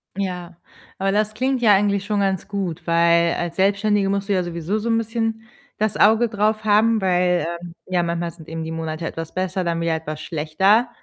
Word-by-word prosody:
Ja, 180 -3 -4 0.4
aber 195 0 0
das 210 +1 +1
klingt 260 +3 -1
ja 215 -3 +6
eigentlich 200 0 +2
schon 205 -1 0
ganz 190 -2 -1
gut, 190 -6 -4
weil 170 0 +3
als 175 -1 -3
Selbstständige 200 +1 +2
musst 200 +1 -2
du - - +3
ja 185 -2 +1
sowieso 175 +4 -3
so 230 +2 -3
'n 225 - +3
bisschen 225 0 -2 0.3
das 215 -1 0
Auge 225 +3 +4
drauf 215 0 0
haben, 215 +1 +3
weil, 180 -1 +2 0.2
ähm, 175 -1 -9
ja, 185 -1 0
manchmal 170 0 -2
sind 160 -1 -15
eben 165 0 -5
die 160 - -5
Monate 160 0 -4
etwas 165 -1 -6
besser, 185 0 -2
dann 170 -1 -1
wieder 165 -1 0
etwas 155 -1 -6
schlechter. 190 +10 +2
190 Hz, 200 wpm, -21 LUFS, 170-210 Hz, 0.4 s, ja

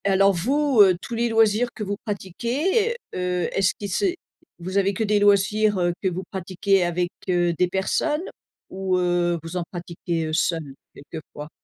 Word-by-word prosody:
Alors 195 0 +4
vous, 265 - +2
heu, 185 -3 +6
tous 235 - -8
les 235 +1 0
loisirs 225 +1 +3
que 215 - -4
vous 205 0 -2
pratiquez, 255 - -1 0.2
heu, 180 -1 -1
est-ce 195 -1 +1
qu'ils 205 -2 -6
se 190 - +1 0.5
vous 185 +3 -4
avez 200 0 +1
que 220 - -1
des 210 -1 +2
loisirs, 205 +1 +3
heu, 175 -1 +1
que 195 - 0
vous 185 +1 -3
pratiquez 190 +1 0
avec, 175 +1 -1 0.2
heu, 175 -1 +2
des 180 +2 +1
personnes 195 - -1 0.5
ou 190 -1 -1
heu, 175 -1 +1
vous 165 +2 -5
en 175 - -1
pratiquez, 170 -1 -4
heu, 155 - -4
seul, 160 -4 -1 0.2
quelque 155 +2 -9
fois? 150 +1 -8
190 Hz, 180 wpm, -23 LUFS, 175-210 Hz, 0.5 s, heu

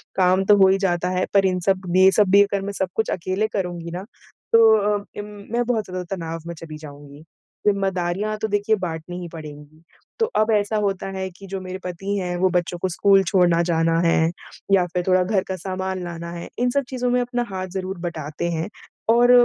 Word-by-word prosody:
काम 185 0 +3
तो 205 +1 +6
हो 190 -1 +7
ही 190 - +4
जाता 180 -2 0
है 185 0 0
पर 195 -1 +5
इन 185 -1 +1
सब 185 -2 +1
ये 190 +1 +8
सब 205 -3 +4
भी 200 - +8
अगर 200 -1 -2
मैं 200 - -4
सब 190 -2 -1
कुछ 220 - 0
अकेले 185 +4 -1
करुँगी 175 -3 -3
ना 180 +2 -5 0.5
तो 225 -1 +7
अ, 210 0 +1 0.2
उम, 205 - -4 0.3
मैं 240 - +2
बहुत 225 -3 0
ज़्यादा 185 -1 -5
तनाव 165 -1 -5
में 170 - -4
चली 160 -1 -9
जाऊँगी, 145 -1 -12 0.5
ज़िम्मेदारियाँ 195 +1 0
तो 220 - -2
देखिए 205 +1 +1
बाँटनी 175 -2 -5
ही 175 - -6
पड़ेंगी। 155 0 -10 0.4
तो 450 - +4
अब 215 +1 +3
ऐसा 205 +1 +1
होता 200 -2 -1
है 190 0 -3
कि 195 - -11
जो 195 0 -4
मेरे 185 0 -6
पति 195 +3 -3
हैं 180 -2 -2
वो 185 +1 +3
बच्चों 175 -1 -1
को 185 - -1
स्कूल 195 +2 +4
छोड़ना 175 -3 +4
जाना 165 0 +2
है, 165 -1 +3 0.4
या 190 -2 +5
फिर 180 +1 -2
थोड़ा 185 0 +4
घर 190 0 +1
का 190 - -2
सामान 185 0 -4
लाना 170 -1 -6
है, 170 0 -7
इन 245 - +2
सब 280 +2 +1
चीज़ों 250 -1 -1
में 250 - +3
अपना 245 0 -1
हाथ 185 -1 -4
ज़रूर 190 0 -3
बटाते 160 -1 -4
हैं 160 0 -2 0.5
और 245 +1 +5
185 Hz, 215 wpm, -22 LUFS, 175-200 Hz, 0.5 s, ये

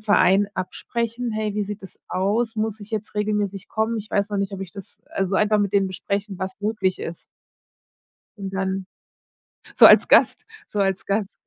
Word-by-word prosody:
Verein 200 -1 +4
absprechen. 235 +5 -3
„Hey, 215 -1 -2
wie 210 - 0
sieht 210 0 -7
es 190 - -12
aus? 210 +5 0
Muss 220 0 -1
ich 205 - -10
jetzt 215 -1 -4
regelmäßig 205 -2 -1
kommen? 220 +1 -1
Ich 210 0 -8
weiß 200 +1 0
noch 205 - -1
nicht, 200 0 -2
ob 195 - -6
ich 190 -2 -6
das“, 195 -3 -12
also, 195 0 -1
einfach 215 0 +3
mit 200 -1 0
denen 195 -1 +3
besprechen, 200 +1 -3
was 190 +2 -5
möglich 205 -3 0
ist. 165 0 -6 1.1
Und 195 -1 -5
dann 190 0 -2 0.9
so - - +9
als - - +7
Gast - - +5 0.3
so 210 - -5
als 195 -1 0
Gast 200 0 -2
200 Hz, 185 wpm, -23 LUFS, 195-215 Hz, 1.1 s, so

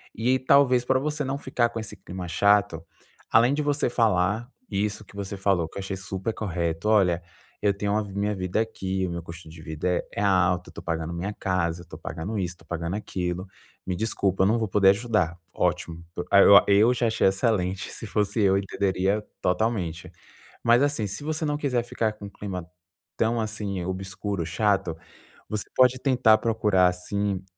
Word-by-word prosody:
e 125 +4 +2
talvez, 130 -2 +4
para 130 +1 +2
você 150 +2 -2
não 135 +1 -2
ficar 125 -4 0
com 115 - -5
esse 110 -1 -7
clima 90 0 -7
chato. 100 -2 +2 0.5
Além 120 +4 +5
de 150 - 0
você 145 -2 +1
falar 110 0 +1 0.2
isso 105 +1 -2
que - - -18
você 100 0 -5
falou, 95 -4 +1
que - - -11
eu - - -3
achei 95 0 -4
super 95 +3 -4
correto: 85 -2 -2
"Olha, 90 -5 +3 0.4
eu 100 -1 +3
tenho 100 +1 -1
a 110 - +1
minha 100 +1 -2
vida 95 +2 -1
aqui, 95 -4 -2
o - - -5
meu 85 0 -5
custo 85 0 -10
de 80 0 -12
vida 80 +3 -2
é - - -4
alto, 90 -2 +2
eu - - -13
estou - - -10
pagando 80 0 -3
minha 95 +5 -3
casa, 90 -4 -1
eu - - -11
estou 85 - -11
pagando 90 +9 -5
isso, 90 -1 -3
pagando 85 +1 -3
aquilo. 90 -2 -4 0.4
Me 90 - -1
desculpa, 95 -2 0
não 110 +4 +2
vou 110 - -1
poder 95 0 +4
ajudar.". 100 -5 +1 0.2
Ótimo, 85 -2 -1 0.3
ó, 100 0 +8
eu 105 +5 +5
já 120 -1 +1
achei 110 - +2
excelente, 95 -2 0
se - - -8
fosse 105 +1 0
eu 95 -1 +4
entenderia 100 +1 0 0.2
totalmente. 90 -3 -1 0.5
Mas, 120 +2 +5
assim, 145 -7 0
se 100 +9 -6
você 155 +1 -2
não 150 -1 0
quiser 130 -5 0
ficar 115 -2 -1
com 100 -1 -9
clima 95 -4 -6 0.5
tão 115 +1 +1
assim 105 -4 -3
obscuro, 95 0 -4
chato, 90 -2 0 0.5
você 105 -1 -2
pode 130 0 +4
tentar 125 -5 +4
procurar, 105 -5 +3
assim, 95 +2 -2
100 Hz, 180 wpm, -25 LUFS, 90-110 Hz, 0.5 s, ó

